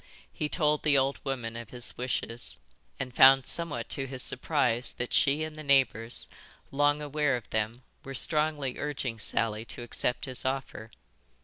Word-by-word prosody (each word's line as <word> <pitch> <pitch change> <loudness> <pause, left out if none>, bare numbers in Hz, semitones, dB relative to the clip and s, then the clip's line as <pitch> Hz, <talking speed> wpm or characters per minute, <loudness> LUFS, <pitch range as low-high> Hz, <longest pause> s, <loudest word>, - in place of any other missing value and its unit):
He 150 - -2
told 150 -3 +2
the 145 -2 +4
old 135 +1 0
woman 125 -5 -3
of 115 -1 -7
his 125 -1 +2
wishes, 120 -1 -4 0.4
and 130 -2 -4
found 135 +1 +8
somewhat 170 -3 -3
to 135 -2 -2
his 130 -1 -5
surprise 125 -4 0
that 120 - -4
she 145 +3 +3
and 155 -1 -5
the - - -6
neighbours, 130 -5 +2 0.4
long 145 +1 +2
aware 145 -2 +1
of 120 - -11
them, 110 +3 -1 0.2
were 135 0 -7
strongly 150 -1 +1
urging 135 -6 -3
Sally 110 0 -1
to 120 - -8
accept 120 +1 -2
his 130 -1 -5
offer. 130 -4 -3
135 Hz, 165 wpm, -29 LUFS, 120-145 Hz, 0.4 s, found